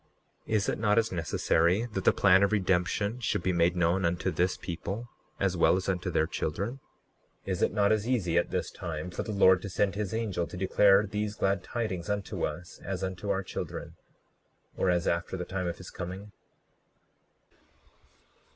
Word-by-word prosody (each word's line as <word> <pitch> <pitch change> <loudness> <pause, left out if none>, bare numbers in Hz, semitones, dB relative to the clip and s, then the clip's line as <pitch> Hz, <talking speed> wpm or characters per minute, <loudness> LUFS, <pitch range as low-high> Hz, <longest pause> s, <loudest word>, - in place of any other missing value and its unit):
39:18 - - -3
Is 105 -2 +1
it - - -2
not 105 -1 +2
as 115 -1 +2
necessary 85 +3 +1
that 95 -2 -3
the - - +7
plan 95 -1 +5
of 100 - +3
redemption 100 +3 +1
should 110 -6 -1
be 95 - +2
made 85 +1 +3
known 90 +2 +2
unto 85 0 0
this 90 +1 0
people 100 +7 -5 0.3
as 95 -2 +1
well 85 - +4
as 95 - -2
unto 90 -1 -1
their 80 -2 +2
children? 100 - -3 0.7
39:19 95 - -3
Is 90 - -2
it - - +3
not 100 0 +2
as 110 +1 +1
easy 100 -10 0
at 85 - +2
this - - -2
time 85 0 -5
for - - -3
the 110 - -4
Lord 95 -3 +5
to 100 - -5
send 100 +1 +1
his 100 -2 -3
angel 105 -7 -1
to - - -8
declare 100 +2 +4
these 105 0 -3
glad 95 -1 0
tidings 105 -6 -3
unto 100 -1 -2
us 90 0 -9
as 95 -1 -4
unto 95 +2 -4
our 95 -1 0
children, - - -6 0.8
or 95 - +1
as 90 -1 +1
after 85 +2 -1
the 90 - -4
time 90 -1 -3
of 85 - -3
his 90 - -10
coming? 95 +3 -7
95 Hz, 190 wpm, -29 LUFS, 90-105 Hz, 0.8 s, the